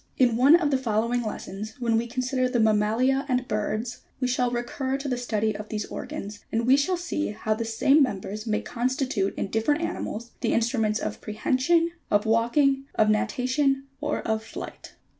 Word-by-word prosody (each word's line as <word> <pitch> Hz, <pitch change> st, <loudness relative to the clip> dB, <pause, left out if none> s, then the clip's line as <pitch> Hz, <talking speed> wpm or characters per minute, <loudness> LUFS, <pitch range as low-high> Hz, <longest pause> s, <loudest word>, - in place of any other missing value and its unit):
In 245 Hz, -3 st, +4 dB
one 270 Hz, +7 st, +7 dB
of 325 Hz, -4 st, +2 dB
the 270 Hz, -, +2 dB
following 235 Hz, 0 st, 0 dB
lessons, 215 Hz, -1 st, -6 dB
when 235 Hz, -2 st, +1 dB
we 230 Hz, +1 st, +1 dB
consider 255 Hz, +1 st, 0 dB
the 250 Hz, -2 st, 0 dB
mam 215 Hz, -1 st, +4 dB
malia 255 Hz, +6 st, +2 dB
and 250 Hz, 0 st, 0 dB
birds, 215 Hz, +3 st, -2 dB, 0.2 s
we 255 Hz, -, 0 dB
shall 250 Hz, 0 st, +1 dB
recur 255 Hz, +3 st, -2 dB
to 275 Hz, +1 st, -5 dB
the 255 Hz, -, 0 dB
study 220 Hz, -3 st, -1 dB
of 210 Hz, +1 st, -7 dB
these 210 Hz, -1 st, -3 dB
organs, 205 Hz, +1 st, -6 dB
and 230 Hz, +1 st, 0 dB
we 260 Hz, +2 st, +6 dB
shall 320 Hz, +6 st, +1 dB
see 345 Hz, -3 st, -2 dB
how 215 Hz, +1 st, -1 dB
the 230 Hz, +1 st, -3 dB
same 270 Hz, +6 st, +4 dB
members 215 Hz, -3 st, -2 dB
may 215 Hz, -1 st, +1 dB
constitute 255 Hz, -4 st, -1 dB
in -, -, -3 dB
different 290 Hz, +8 st, +1 dB
animals, 235 Hz, -8 st, -4 dB
the -, -, +1 dB
instruments 225 Hz, -2 st, +1 dB
of -, -, -4 dB
prehension, 260 Hz, +10 st, +1 dB, 0.2 s
of 205 Hz, +1 st, +2 dB
walking, 270 Hz, +5 st, +2 dB
of 215 Hz, -1 st, +4 dB
natation, 270 Hz, +4 st, +1 dB, 0.2 s
or -, -, -1 dB
of 220 Hz, 0 st, -1 dB
flight. -, -, -9 dB
240 Hz, 185 wpm, -26 LUFS, 220-265 Hz, 0.2 s, one